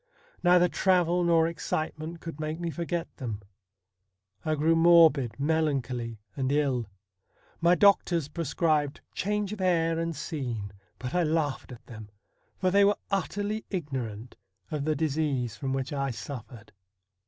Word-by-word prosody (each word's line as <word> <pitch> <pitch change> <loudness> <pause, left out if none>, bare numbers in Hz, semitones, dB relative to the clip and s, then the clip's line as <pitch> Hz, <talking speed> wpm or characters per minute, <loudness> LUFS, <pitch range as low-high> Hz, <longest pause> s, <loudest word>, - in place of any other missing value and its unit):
Neither 180 0 +5
travel 180 -1 +2
nor 165 -1 +4
excitement 160 0 -4
could 165 -3 -7
make 155 +1 -3
me 170 -1 -2
forget 170 +1 -3
them. 115 -6 -4 1.0
I 155 -1 0
grew 160 +3 +3
morbid, 160 -8 +5
melancholy, 135 -6 0 0.2
and 130 0 -1
ill. 135 -6 +1 0.7
My 170 +1 +5
doctors 175 -4 +4
prescribed 155 -2 0
change 210 0 -1
of 210 - -6
air 165 -3 +2
and 165 -1 -2
scene, 125 - -4 0.2
but 125 -1 -6
I 180 - +2
laughed 155 -5 -1
at 120 - -11
them, 110 -3 -10 0.5
for 185 -1 +1
they 200 +1 +5
were 205 +1 +4
utterly 205 +2 -1
ignorant 130 - -5 0.3
of 150 -2 -2
the 155 0 +1
disease 145 -7 -1
from 135 +6 -4
which 135 +1 -2
I 140 -1 -1
suffered. 115 -2 -8
155 Hz, 140 wpm, -28 LUFS, 135-170 Hz, 1.0 s, Neither